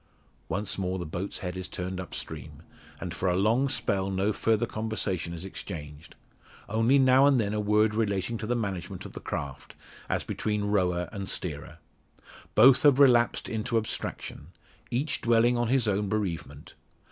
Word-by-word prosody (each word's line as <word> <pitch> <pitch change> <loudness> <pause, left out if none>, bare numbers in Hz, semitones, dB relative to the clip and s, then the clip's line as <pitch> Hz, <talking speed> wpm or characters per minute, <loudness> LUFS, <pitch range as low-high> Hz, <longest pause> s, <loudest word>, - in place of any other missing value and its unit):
Once 100 +2 -2
more 95 0 -1
the 90 - -4
boat's 90 +5 -5
head 90 0 -3
is 95 0 -5
turned 90 +1 -5
upstream, 90 - -7 0.4
and - - -5
for 95 - -1
a 90 - +1
long 115 +8 +2
spell 95 -6 0
no 95 +2 0
further 115 +2 +1
conversation 110 -6 -2
is 85 +2 -6
exchanged 75 -6 -8 0.5
only 115 +6 +3
now 130 +1 +6
and 135 -3 +4
then 105 -2 0
a 105 - -1
word 105 +1 +3
relating 105 0 -1
to 110 -1 -4
the 120 - +1
management 100 -6 -4
of - - -9
the - - -7
craft, 70 -2 -6 0.3
as - - 0
between 105 -1 -2
rower 90 -4 +1
and 100 -3 -5
steerer. 75 -6 -4 0.8
Both 130 +5 +7
have 145 -3 +6
relapsed 120 -4 +4
into 115 +1 -1
abstraction 110 -8 -4 0.4
each 140 +4 -1
dwelling 120 +1 +4
on 120 -1 0
his 125 -1 +2
own 100 0 0
bereavement. 100 -6 -4
105 Hz, 165 wpm, -28 LUFS, 95-115 Hz, 0.8 s, Both